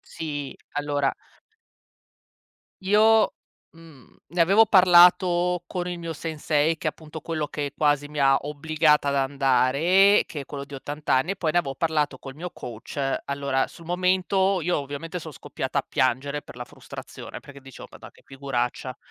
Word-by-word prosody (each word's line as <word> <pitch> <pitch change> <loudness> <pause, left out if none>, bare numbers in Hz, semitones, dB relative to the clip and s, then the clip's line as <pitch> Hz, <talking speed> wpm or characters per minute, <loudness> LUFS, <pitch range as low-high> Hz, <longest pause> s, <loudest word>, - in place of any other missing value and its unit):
Sì, 145 -3 -6 0.2
allora 145 -1 -1 1.7
io, 215 +3 +4 0.4
mhmm, 160 -6 -18
ne 175 +2 0
avevo 195 +6 +5
parlato 180 -2 +5
con 180 0 -4
il 175 -1 -4
mio 165 -1 -5
sensei, 155 0 -1
che 155 - -4
è - - +4
appunto 155 0 -11
quello 155 -2 -3
che 145 -2 -4
quasi 145 -1 +1
mi 150 0 -6
ha 135 -1 +5
obbligata 150 0 +1
ad 140 - 0
andare, 140 +8 +3
che 150 - -7
è - - -10
quello 140 0 -7
di 145 - -14
80 145 +2 -8
anni, 135 +8 +2
e - - -3
poi 165 -4 -1
ne 175 - +4
avevo 135 -5 -4
parlato 150 -3 0
col 135 +1 -10
mio 175 +3 -6
coach. 120 +3 -10 0.3
Allora 140 -1 -1
sul 165 - -15
momento 185 +2 +1
io 175 +2 0
ovviamente 145 +5 -6
son 160 -1 -9
scoppiata 130 0 -4
a - - -6
piangere 135 +3 0
per 125 - -14
la 125 - -6
frustrazione - - -10
perché 140 -1 -14
dicevo: 135 -1 -12
"Ma - - -14
dai, - - -12
che - - -23
figuraccia". 130 -2 -4
150 Hz, 170 wpm, -24 LUFS, 140-175 Hz, 1.7 s, avevo